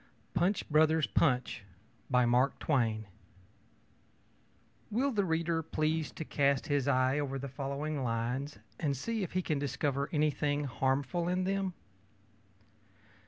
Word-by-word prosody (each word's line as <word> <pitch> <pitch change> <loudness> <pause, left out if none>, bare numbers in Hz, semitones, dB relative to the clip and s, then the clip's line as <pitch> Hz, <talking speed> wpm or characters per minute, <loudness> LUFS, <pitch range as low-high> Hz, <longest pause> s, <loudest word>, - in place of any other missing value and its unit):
PUNCH, 175 +4 +1
BROTHERS, 155 0 +4
PUNCH 125 -9 +1 0.5
Will 125 +1 +4 2.6
the 210 -4 +1
reader 165 -1 0
please 155 0 -1
to 160 - -6
cast 140 -2 +1
his 145 -3 0
eye 130 +2 +3
over 135 -2 -2
the 135 +1 -5
following 140 +2 -3
lines, 125 +5 -2 0.2
and 140 -4 0
see 225 - -2
if 185 - -4
he 185 0 0
can 155 -4 0
discover 140 0 -1
anything 150 -1 +1
harmful 135 +5 0
in 180 +1 +1
them? 195 -1 -1
145 Hz, 115 wpm, -32 LUFS, 135-165 Hz, 2.6 s, BROTHERS